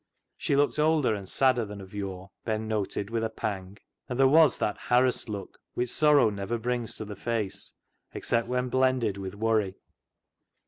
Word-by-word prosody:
She 140 - 0
looked 145 +2 +2
older 150 -6 +3
and 100 -3 -6
sadder 130 -3 +3
than 105 -1 -7
of 95 0 -11
yore, 95 -1 -6
Ben 110 -1 -2
noted 105 -1 -2
with 115 -1 -1
a 110 - 0
pang, 100 -3 -5 0.3
and 125 - -3
there 135 - +7
was 155 +2 +5
that 105 - -1
harassed 125 -1 +2
look 100 -2 -6 0.2
which 125 0 -1
sorrow 150 -7 +5
never 100 +3 -3
brings 120 0 -2
to 110 - -5
the 105 0 -7
face 110 -2 -3 0.4
except 115 -1 0
when 125 0 -1
blended 130 -5 +1
with 95 0 -6
worry. 110 -3 +1
110 Hz, 175 wpm, -28 LUFS, 100-125 Hz, 0.4 s, there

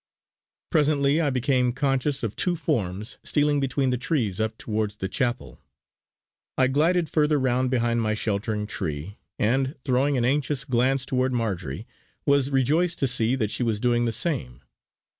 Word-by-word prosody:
Presently 150 -1 +3
I 150 - +1
became 125 -1 +1
conscious 135 0 0
of 110 -3 -2
two 180 -1 +1
forms 110 - -3
stealing 145 0 +2
between 135 -1 0
the 125 - -1
trees 120 - -1
up 110 0 -2
towards 105 -2 -2
the 95 - -4
chapel. 120 +4 -3 1.0
I 130 - +4
glided 165 +5 +2
further 150 -1 +2
round 130 0 +1
behind 120 -2 +1
my 110 -1 0
sheltering 105 0 -2
tree, 80 -1 -5 0.2
and, 130 +6 +1
throwing 135 +1 +2
an 120 - +1
anxious 140 +1 0
glance 130 +1 +1
toward 130 0 0
Marjory, 95 - -3 0.4
was 140 -2 +3
rejoiced 150 +6 +1
to 135 - +1
see 120 0 +2
that 110 -5 -1
she - - -3
was 115 -3 0
doing 120 0 +2
the 115 - 0
same. 110 - -2
130 Hz, 160 wpm, -25 LUFS, 110-140 Hz, 1.0 s, I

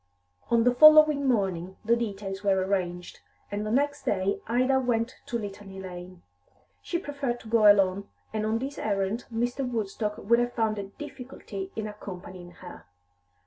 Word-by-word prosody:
On 235 -1 +4
the 245 +1 +4
following 305 0 +7
morning 190 -6 0
the 230 +2 +4
details 200 -4 -4
were 195 -1 +3
arranged, 180 -2 -3 0.3
and 205 +1 -2
the 215 - -3
next 285 +5 +1
day 195 0 0
Ida 255 +3 +2
went 245 -1 0
to 235 - -1
Litany 200 -2 -8
Lane. 180 -1 -9 0.6
She 345 - -2
preferred 280 -7 -3
to - - -13
go 215 -2 +7
alone, 195 0 +1 0.2
and 215 -1 -1
on 220 +1 0
this 270 +4 -5
errand 200 +2 -1
Mr. 245 +4 -1
Woodstock 215 -3 -3
would 235 +3 +2
have 240 0 -1
found 220 -2 0
a 200 - -4
difficulty 250 -5 -8
in 220 - -3
accompanying 185 -3 -9
her. 175 - -12
215 Hz, 160 wpm, -27 LUFS, 195-245 Hz, 0.6 s, following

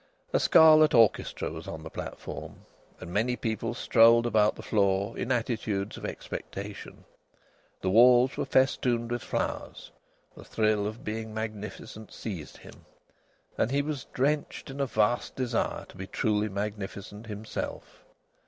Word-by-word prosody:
A - - +4
scarlet 155 -3 +6
orchestra 115 -8 +3
was 80 +1 -8
on 80 - -7
the 80 - -8
platform, - - -7 0.4
and 90 -1 -8
many 120 +5 +1
people 115 0 -3
strolled 115 0 +5
about 110 -3 +3
the - - -10
floor 100 0 +1
in 125 - -3
attitudes 110 -5 -1
of - - -7
expectation. 100 +1 -7 0.8
The 95 - 0
walls 125 +4 +6
were - - -2
festooned 120 -3 +1
with 120 -1 -2
flowers. - - -4 0.4
The - - -12
thrill 110 -2 +1
of 110 +2 -7
being 110 0 -5
magnificent 110 0 -6
seized 90 -9 -7
him, - - -15 0.8
and - - +2
he 140 +2 +1
was 145 -4 -4
drenched 145 +1 -1
in 135 - -8
a 140 - +1
vast 110 +1 0
desire 125 -3 -1
to - - -16
be 95 +1 -6
truly 105 0 0
magnificent 105 +1 -5
himself. 105 0 -6
110 Hz, 145 wpm, -28 LUFS, 105-120 Hz, 0.8 s, scarlet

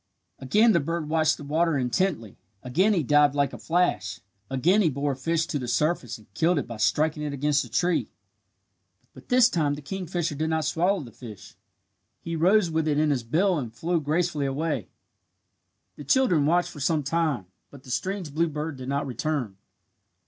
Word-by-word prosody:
Again 210 - +4
the 170 - +3
bird 165 +1 -3
watched 155 0 +2
the - - -9
water 160 +2 +1
intently. 125 - -1 0.2
Again 175 +12 +2
he 170 - +1
dived 145 +1 +4
like 140 -2 +1
a - - -8
flash. 105 - 0 0.3
Again 165 +11 +3
he 170 - +3
bore 140 +1 -1
a - - -3
fish 165 +5 0
to 145 - -3
the 125 - -5
surface 125 -1 0
and 110 - -19
killed 165 - +2
it 140 - -1
by 115 -2 -8
striking 150 +9 +1
it 150 -1 -3
against 140 +1 +1
the - - -8
tree. 175 -1 0 1.0
But - - -16
this 250 -2 +6
time 150 - 0
the 145 - -9
kingfisher 175 0 -3
did 155 +2 -2
not 160 -1 0
swallow 180 +3 +1
the 120 -5 -10
fish. 110 -4 -12 0.6
He 170 0 -5
rose 180 +2 +3
with 160 0 0
it 150 -1 +1
in 155 0 +2
his 135 -3 0
bill 170 +9 +1
and 120 -5 -5
flew 165 +7 -1
gracefully 155 -1 0
away. 140 - -2 1.1
The 145 - -8
children 165 - +3
watched 175 +2 +2
for 150 - -11
some 150 +2 +1
time, 155 - -1 0.2
but 140 -2 -14
the 125 - -9
strange 180 +3 -3
blue 165 +2 +1
bird 150 -1 -4
did 130 0 -7
not 140 +1 -1
return. 130 -4 -3
150 Hz, 190 wpm, -26 LUFS, 135-170 Hz, 1.1 s, this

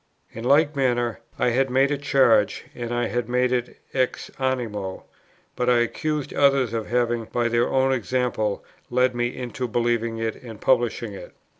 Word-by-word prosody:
In 115 - -8
like 145 +4 +4
manner 120 -4 0 0.2
I - - +2
had 135 +3 +2
made 135 +3 +3
a 145 - +1
charge, 130 -8 +3
and 120 -3 -5
I 120 0 0
had 120 -1 -2
made 125 0 +2
it 125 -1 -2 0.2
ex 130 -1 -1
animo; 115 -8 -2 0.5
but 125 0 0
I 125 - +5
accused 150 +5 -2
others 135 -4 +3
of 110 -2 -2
having, 120 -1 0
by 120 +1 -1
their 120 +1 +2
own 135 0 +2
example, 120 -4 -1 0.2
led 125 +1 +2
me 120 0 0
into 125 +1 -4
believing 115 0 0
it 115 -1 -2
and 115 -4 -10
publishing 120 -4 +1
it. 100 - -10
120 Hz, 170 wpm, -24 LUFS, 115-130 Hz, 0.5 s, I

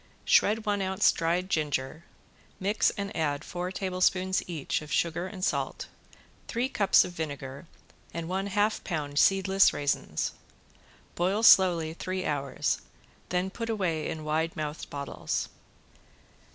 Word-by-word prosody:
Shred 215 +1 +4
one 205 -1 0
ounce 190 +1 +3
dried 170 +3 0
ginger, 150 -2 -2 0.5
mix 200 +3 +2
and 200 0 -5
add 145 -3 -1
four 180 +1 -4
tablespoons 185 0 +1
each 155 -4 -2
of 150 -1 -10
sugar 170 +5 0
and 190 -1 -4
salt, - - -2 0.6
three 240 +3 -1
cups 205 -7 +4
of - - -6
vinegar 145 -2 -6 0.4
and 170 -1 -5
one 190 +2 -2
half 205 +2 +1
pound 145 -5 -2
seedless 195 0 +4
raisins. 140 - -1 0.8
Boil 190 +5 0
slowly 175 -7 +6
three 185 +2 -4
hours, 140 -2 -1 0.5
then 180 +1 -1
put 230 +2 -5
away 180 -8 -1
in 155 - -5
wide 160 +2 -1
mouthed 150 0 -5
bottles. 140 -1 -3
180 Hz, 130 wpm, -28 LUFS, 155-195 Hz, 0.8 s, slowly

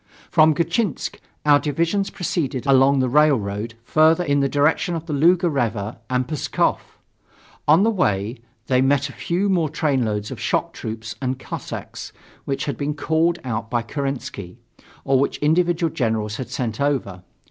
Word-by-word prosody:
From 155 0 +5
Gatchinsk, 170 +3 -1 0.3
our 145 -1 +6
divisions 170 +7 0
proceeded 145 -8 -2
along 135 0 +5
the 130 - +1
railroad 115 -6 +1
further 160 +6 +4
in 145 -3 +1
the 140 0 +1
direction 155 +5 +1
of 165 0 -5
the 160 - -4
Luga 175 +5 +4
River 115 -8 -2
and 125 0 0
Pskov. 150 -2 0 0.9
On 160 +6 +6
the 225 - +3
way, 105 - 0 0.3
they 130 0 +2
met 140 +1 +2
a - - -10
few 180 +4 -1
more 175 -6 +1
trainloads 125 -9 -1
of - - -7
shock - - -1
troops 110 0 -6
and 130 -1 -1
Cossacks, - - -7 0.3
which 135 - -2
had 145 - -3
been 145 +1 -2
called 160 +3 +1
out 110 -3 -3
by 120 -1 0
Kerensky, 125 -8 -5 0.5
or 135 -1 +3
which 140 - 0
individual 170 +1 +1
generals 110 -3 -1
had 125 -3 -6
sent 120 -2 -3
over. 130 -11 -1
140 Hz, 160 wpm, -22 LUFS, 120-160 Hz, 0.9 s, our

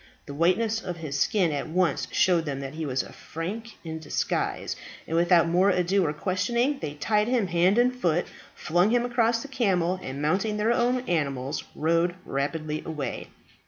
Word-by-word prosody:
The 140 - -8
whiteness 205 +8 +2
of 180 -4 -5
his 145 -4 -4
skin 185 -2 +2
at 145 +1 -3
once 180 +1 +1
showed 175 -3 +3
them 140 -2 -3
that 135 +1 -6
he 160 -1 -4
was 130 -1 0
a - - -12
Frank 210 +8 -6
in 160 -1 -5
disguise, 160 - -2 0.3
and 165 - -3
without 170 0 +4
more 180 +4 +3
ado 185 +1 +2
or - - 0
questioning, 235 - 0
they 150 -2 -5
tied 210 +7 +1
him 245 -4 +2
hand 180 +3 +3
and 250 +1 +3
foot, 175 -8 +1 0.3
flung 175 +5 +2
him 240 +1 +2
across 235 -1 +1
the - - -7
camel, 185 -9 +1
and, 135 -4 -6
mounting 190 +8 0
their 215 +2 +2
own 245 +1 +1
animals, 140 - -2
rode 170 +3 +1
rapidly 150 +3 -2
away. 145 -6 -4
175 Hz, 180 wpm, -26 LUFS, 155-215 Hz, 0.3 s, without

